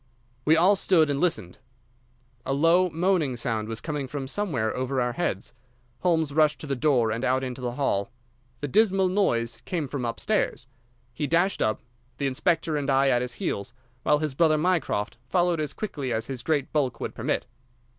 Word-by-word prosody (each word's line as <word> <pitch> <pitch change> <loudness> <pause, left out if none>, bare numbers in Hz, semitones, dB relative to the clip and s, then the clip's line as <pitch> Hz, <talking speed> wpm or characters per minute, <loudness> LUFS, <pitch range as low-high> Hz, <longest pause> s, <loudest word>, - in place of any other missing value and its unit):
We 155 - +6
all 185 +5 +5
stood 170 -5 +3
still - - +2
and 140 - -1
listened. 110 - -1 0.8
A 135 - -1
low 165 +6 +4
moaning 165 -5 +1
sound 110 -2 -2
was 115 0 -4
coming 145 +1 -4
from 135 0 -5
somewhere 135 - -1
over 130 +1 -1
our 125 -1 0
heads. 120 - -3 0.5
Holmes 160 -5 +1
rushed 150 -2 +3
to - - -6
the 140 -2 -1
door 125 -5 +2
and 115 +3 -3
out 130 +1 +1
into 125 0 -5
the 120 -1 -2
hall. 110 -7 0 0.5
The 145 - -2
dismal 195 - +3
noise 115 - 0
came 165 -6 -2
from 135 -1 -4
upstairs. 115 - -1 0.5
He 145 - -2
dashed 175 +5 +2
up, 110 - 0 0.4
the 140 - -2
inspector 155 +3 +1
and 145 -1 -2
I 135 0 +4
at 120 -2 +3
his 125 -1 -3
heels, 100 0 -3 0.3
while 150 +3 +3
his 150 -2 -2
brother 155 +2 +3
Mycroft 155 - 0
followed 175 0 +2
as 150 -2 -2
quickly 145 - -4
as 110 -1 -1
his 130 -2 -5
great 145 0 -1
bulk 130 -6 0
would - - -4
permit. - - -2
140 Hz, 185 wpm, -26 LUFS, 125-165 Hz, 0.8 s, We